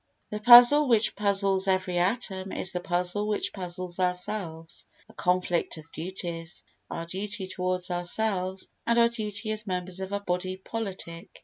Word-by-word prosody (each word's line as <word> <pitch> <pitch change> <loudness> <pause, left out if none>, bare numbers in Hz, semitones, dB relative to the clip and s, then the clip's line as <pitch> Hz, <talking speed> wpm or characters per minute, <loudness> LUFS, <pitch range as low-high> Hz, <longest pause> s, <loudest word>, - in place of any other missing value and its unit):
The 210 - -4
puzzle 245 +6 +9
which 225 -3 +2
puzzles 195 -1 +2
every 185 -2 0
atom 190 -1 0
is 185 - 0
the 180 - -2
puzzle 180 +3 -1
which 210 -1 -1
puzzles 180 -1 -5
ourselves—a 180 +1 -4
conflict 180 -4 -1
of 160 +1 -14
duties—our 170 -1 -6
duty 195 +3 -5
towards 185 0 -2
ourselves, 185 +1 -1 0.2
and 235 0 +2
our 235 0 +5
duty 215 -2 -4
as 215 0 -2
members 180 0 -3
of 190 0 -6
a 200 - -1
body 185 -1 -3
politic. 190 -4 -7
190 Hz, 140 wpm, -27 LUFS, 180-210 Hz, 0.2 s, puzzle